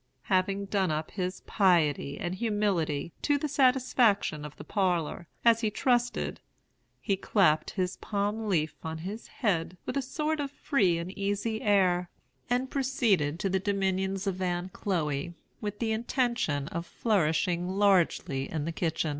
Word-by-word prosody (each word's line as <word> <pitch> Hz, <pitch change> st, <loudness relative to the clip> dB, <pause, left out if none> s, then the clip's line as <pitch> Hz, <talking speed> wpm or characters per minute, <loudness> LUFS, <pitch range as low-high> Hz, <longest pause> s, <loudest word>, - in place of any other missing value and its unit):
"Having 195 Hz, +2 st, +1 dB
done 195 Hz, -2 st, +1 dB
up 155 Hz, 0 st, -2 dB
his 185 Hz, -1 st, -3 dB
piety 160 Hz, -8 st, +2 dB
and 175 Hz, -1 st, -2 dB
humility, 190 Hz, -8 st, 0 dB
to 290 Hz, -, +2 dB
the 300 Hz, -, -2 dB
satisfaction 250 Hz, -, +3 dB
of 150 Hz, -1 st, -8 dB
the -, -, -8 dB
parlor, 175 Hz, -4 st, -1 dB, 0.2 s
as 230 Hz, -1 st, +5 dB
he 220 Hz, -, +1 dB
trusted, 245 Hz, +2 st, 0 dB, 0.6 s
he 200 Hz, -, 0 dB
clapped 180 Hz, -6 st, +2 dB
his 185 Hz, -2 st, -2 dB
palm 210 Hz, +2 st, -2 dB
leaf 160 Hz, -5 st, +1 dB
on 160 Hz, 0 st, -4 dB
his 195 Hz, +8 st, -6 dB
head 180 Hz, -6 st, -1 dB
with -, -, -3 dB
a 275 Hz, -, +1 dB
sort 305 Hz, +4 st, -2 dB
of 285 Hz, -1 st, -2 dB
free 200 Hz, -11 st, +1 dB
and 170 Hz, +2 st, -4 dB
easy 205 Hz, +3 st, -1 dB
air, 185 Hz, -4 st, +3 dB, 0.4 s
and 250 Hz, +2 st, 0 dB
proceeded 230 Hz, -, +1 dB
to 195 Hz, -, 0 dB
the 190 Hz, 0 st, +1 dB
dominions 195 Hz, 0 st, -1 dB
of 190 Hz, -1 st, -2 dB
Aunt 180 Hz, 0 st, -2 dB
Chloe, 165 Hz, -3 st, -2 dB, 0.3 s
with 205 Hz, -1 st, -4 dB
the 225 Hz, 0 st, -1 dB
intention 230 Hz, -, 0 dB
of 170 Hz, +1 st, -4 dB
flourishing 175 Hz, -3 st, +1 dB
largely 185 Hz, -8 st, +2 dB
in 155 Hz, -2 st, -3 dB
the 165 Hz, -, -2 dB
kitchen." 160 Hz, -1 st, -1 dB
190 Hz, 155 wpm, -29 LUFS, 170-220 Hz, 0.6 s, as